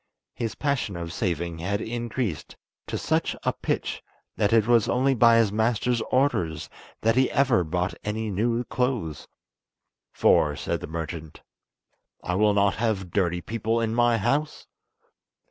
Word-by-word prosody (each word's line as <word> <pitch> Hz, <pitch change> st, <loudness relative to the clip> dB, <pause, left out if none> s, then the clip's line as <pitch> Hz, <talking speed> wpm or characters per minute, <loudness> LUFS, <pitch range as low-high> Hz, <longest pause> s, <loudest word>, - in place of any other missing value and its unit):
His 115 Hz, -2 st, -4 dB
passion 140 Hz, -9 st, -1 dB
of 85 Hz, -1 st, -5 dB
saving 85 Hz, -4 st, -2 dB
had 100 Hz, +4 st, -1 dB
increased 115 Hz, -, -4 dB, 0.3 s
to -, -, -3 dB
such -, -, 0 dB
a -, -, +1 dB
pitch -, -, -3 dB, 0.3 s
that 100 Hz, -, +1 dB
it 115 Hz, -2 st, +4 dB
was 120 Hz, -2 st, +3 dB
only 135 Hz, +2 st, +2 dB
by 115 Hz, -1 st, +5 dB
his 115 Hz, -3 st, +3 dB
master's 115 Hz, +2 st, +1 dB
orders 85 Hz, -, 0 dB, 0.3 s
that 115 Hz, +1 st, +2 dB
he 130 Hz, 0 st, +3 dB
ever 130 Hz, -9 st, +3 dB
bought 90 Hz, +3 st, -2 dB
any 110 Hz, +1 st, -3 dB
new 115 Hz, +5 st, 0 dB
clothes, 120 Hz, -, -2 dB, 0.8 s
"For," 75 Hz, -1 st, +3 dB
said -, -, -2 dB
the -, -, -7 dB
merchant, 80 Hz, -1 st, -6 dB, 0.8 s
"I 90 Hz, -, -2 dB
will 105 Hz, +2 st, +3 dB
not 100 Hz, 0 st, +2 dB
have 105 Hz, -6 st, -1 dB
dirty 90 Hz, -2 st, 0 dB
people 115 Hz, +2 st, -1 dB
in 115 Hz, -1 st, -1 dB
my 120 Hz, 0 st, +3 dB
house." 145 Hz, +9 st, -1 dB
110 Hz, 145 wpm, -25 LUFS, 90-120 Hz, 0.8 s, by